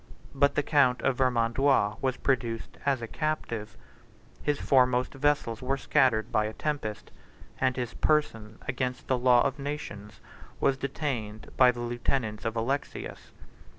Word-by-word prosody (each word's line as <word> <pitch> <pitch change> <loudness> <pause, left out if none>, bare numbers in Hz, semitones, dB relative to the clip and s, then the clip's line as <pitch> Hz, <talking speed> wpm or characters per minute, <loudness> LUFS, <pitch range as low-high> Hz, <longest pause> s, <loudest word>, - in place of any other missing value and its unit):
But 140 +1 +3
the 145 - +2
count 135 -4 +3
of 130 - +1
Vermandois 125 -3 +2
was 130 -1 0
produced 120 -4 -2
as 135 -4 +1
a - - -4
captive; 120 -8 -3 0.6
his 145 -1 0
foremost 125 -1 +3
vessels 135 -5 0
were 135 +2 -1
scattered 125 -5 +2
by 110 0 +2
a 110 - -4
tempest; 110 -9 -4 0.5
and 130 -1 +2
his 125 -2 -3
person, 115 -8 0
against 125 0 -2
the 130 -1 0
law 125 -1 +5
of 140 +1 -1
nations, 125 -8 -6 0.4
was 135 - +3
detained 130 -6 -4
by 130 -1 +6
the 120 -1 -2
lieutenants 120 -2 -2
of 115 0 -1
Alexius. 130 +5 -3
125 Hz, 145 wpm, -28 LUFS, 115-140 Hz, 0.6 s, by